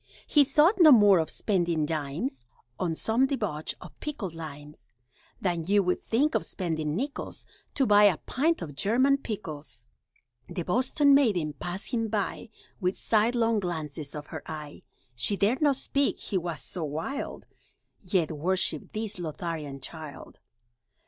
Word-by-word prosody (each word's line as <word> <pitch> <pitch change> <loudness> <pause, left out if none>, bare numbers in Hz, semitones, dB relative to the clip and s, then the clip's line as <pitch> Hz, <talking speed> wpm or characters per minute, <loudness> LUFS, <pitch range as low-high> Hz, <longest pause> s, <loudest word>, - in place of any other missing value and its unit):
He 295 - +5
thought 300 +9 +4
no 315 -3 +10
more 205 -7 +7
of 160 - -1
spending 170 -6 0
dimes 150 - -3 0.3
On 170 -3 0
some 230 +9 +2
debauch 210 - -2
of - - -13
pickled 230 - -4
limes, 150 -7 -10 0.5
Than 175 -4 -1
you 200 0 +4
would 180 0 0
think 285 +8 +1
of - - +1
spending 160 -5 -2
nickels 275 +8 -4 0.3
To 270 - +3
buy 210 -2 +6
a 190 -6 +5
pint 315 - 0
of 150 -3 -7
German 255 - +3
pickles! 155 - -5 0.6
The 175 - -3
Boston 260 - +3
maiden 200 - +3
passed 175 +7 -5
him 230 -2 0
by 210 +1 -2 0.3
With 185 -1 0
sidelong 225 0 +2
glances 155 -5 -4
of 150 0 -6
her - - -4
eye, 150 -2 -7 0.3
She 130 - 0
dared 220 +9 +2
not 290 -2 +4
speak 275 +1 0
(he 205 - -5
was 165 -5 -4
so 175 +4 -5
wild), 160 - -4 0.6
Yet 180 -4 +1
worshiped 165 0 -1
this 215 -2 -3
Lotharian 155 -4 -5
child. 155 -2 -9
185 Hz, 150 wpm, -28 LUFS, 155-230 Hz, 0.6 s, no